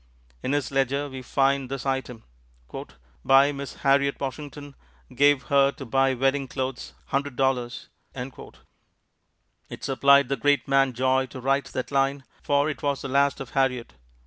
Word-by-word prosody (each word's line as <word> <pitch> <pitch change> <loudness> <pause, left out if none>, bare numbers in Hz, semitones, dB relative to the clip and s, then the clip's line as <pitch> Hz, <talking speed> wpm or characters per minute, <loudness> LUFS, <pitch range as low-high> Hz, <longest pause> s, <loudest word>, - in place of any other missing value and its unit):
In 135 - -2
his 145 -2 -1
ledger 135 +1 0
we 130 -1 -7
find 135 +1 +1
this 135 -1 -5
item: 130 -4 -3 1.0
"By 135 +2 +5
Miss 140 -1 -7
Harriot 140 0 +2
Washington, 145 +1 -6 0.4
gave 145 +1 +4
her 140 -1 +3
to 135 - -9
buy 135 +2 +2
wedding 135 +2 0
clothes, 130 0 -5 0.2
$100.00." 135 -3 -1 1.8
It - - -9
supplied 140 0 +4
the 140 - 0
great 145 +4 +2
man 135 -1 +3
joy 130 +2 +1
to 130 - -9
write 135 +1 +1
that 130 +1 -5
line, 135 0 +1 0.2
for 145 0 +1
it 155 - -4
was 140 -1 -1
the 135 - -4
last 140 +1 +2
of 135 - -8
Harriot. 130 -3 0
135 Hz, 145 wpm, -25 LUFS, 130-140 Hz, 1.8 s, By